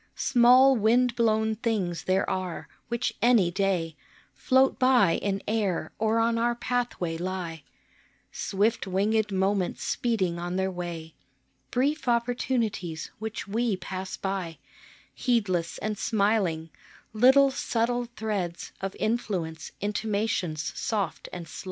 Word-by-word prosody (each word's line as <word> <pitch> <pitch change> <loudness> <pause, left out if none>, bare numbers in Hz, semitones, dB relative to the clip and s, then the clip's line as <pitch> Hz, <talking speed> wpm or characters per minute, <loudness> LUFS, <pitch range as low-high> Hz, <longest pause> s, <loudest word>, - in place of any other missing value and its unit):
Small 255 +2 +6
wind 235 +2 +3
blown 220 -2 +2
things 205 -7 -2
there 190 +1 +1
are, 185 -2 -3 0.2
which 235 +1 -1
any 225 -7 +4
day 180 -4 0 0.4
Float 260 - +2
by 255 -8 +5
in 195 -1 -2
air 210 -5 -1
or 220 +1 +2
on 230 0 +2
our 240 +1 +1
pathway 235 -9 -2
lie, 175 -3 -4 0.7
Swift 205 +2 0
winged 210 +3 +1
moments 190 -1 0
speeding 190 -8 0
on 175 +1 -3
their 190 0 0
way, 170 -3 -6 0.6
Brief 275 +3 0
opportunities, 235 -8 -1
which 220 -1 -5
we 220 0 0
pass 185 +1 -6
by 190 -4 -3 0.6
Heedless 185 -9 0
and 215 0 -3
smiling, 200 -7 +1 0.4
little 265 +5 +6
subtle 240 -1 -1
threads 200 -6 -3
Of 195 0 -4
influence 195 -8 -2
intimations 205 -6 -1
soft 210 -3 -2
and 175 -2 -7
sly. - - -9
210 Hz, 120 wpm, -27 LUFS, 180-235 Hz, 0.7 s, Small